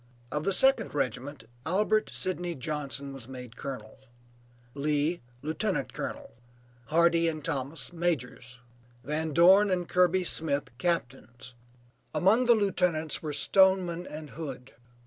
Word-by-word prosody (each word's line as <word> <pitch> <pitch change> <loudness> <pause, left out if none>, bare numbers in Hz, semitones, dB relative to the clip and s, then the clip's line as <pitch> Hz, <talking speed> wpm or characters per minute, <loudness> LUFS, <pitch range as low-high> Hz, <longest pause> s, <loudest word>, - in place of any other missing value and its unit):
Of 150 +1 -2
the 195 - +2
second 240 - +4
regiment 135 0 -3 0.2
Albert 210 +5 +1
Sidney 175 -2 -3
Johnson 140 0 -4
was 130 -4 -8
made 125 -2 -9
colonel; 125 -4 -7 0.7
Lee, 150 +3 0 0.2
lieutenant 170 +7 -2
colonel; - - -6 0.6
Hardee 170 +1 +3
and 155 -2 -3
Thomas, 145 +2 -3
majors; 135 -7 -3 0.5
Van 155 +4 -2
Dorn 190 +6 +6
and 180 -2 -1
Kirby 180 0 +3
Smith, 145 -7 -1
captains; 130 -6 -3 0.6
among 220 +7 +3
the 240 - +7
lieutenants 180 -7 0
were 155 - -4
Stoneman 180 +3 +2
and 150 -1 -8
Hood. 135 -6 -8
160 Hz, 120 wpm, -28 LUFS, 140-180 Hz, 0.7 s, the